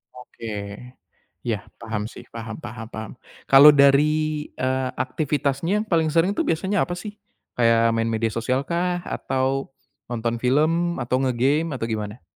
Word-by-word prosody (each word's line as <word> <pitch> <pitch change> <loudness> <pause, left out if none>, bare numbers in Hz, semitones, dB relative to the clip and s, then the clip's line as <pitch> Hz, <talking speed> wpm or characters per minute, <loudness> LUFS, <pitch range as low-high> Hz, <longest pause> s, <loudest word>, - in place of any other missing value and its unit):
Oke, 105 -5 -7 0.7
iya 115 -4 -1 0.2
paham 110 -2 -3
sih - - -11
paham 115 -1 -6
paham 110 0 -7
paham 110 -1 -6 0.4
kalau 140 +2 +10
dari, 140 +1 +6 0.5
eee, 130 0 -1
aktivitasnya 150 +7 -1
yang 220 - -17
paling 165 -2 +3
sering 165 +5 +3
itu - - +1
biasanya 190 +4 +1
apa 175 - -3
sih? 205 +4 -7 0.4
Kayak 115 -1 +4
main 115 0 0
media 115 0 0
sosialkah? 170 +10 -1
Atau, 135 +1 -2 0.3
nonton 120 0 -2
film 155 +6 +1
atau 125 +1 0
ngegame 135 +6 +1
atau 125 -4 -3
gimana? 105 +1 -4
130 Hz, 140 wpm, -23 LUFS, 115-160 Hz, 0.7 s, kalau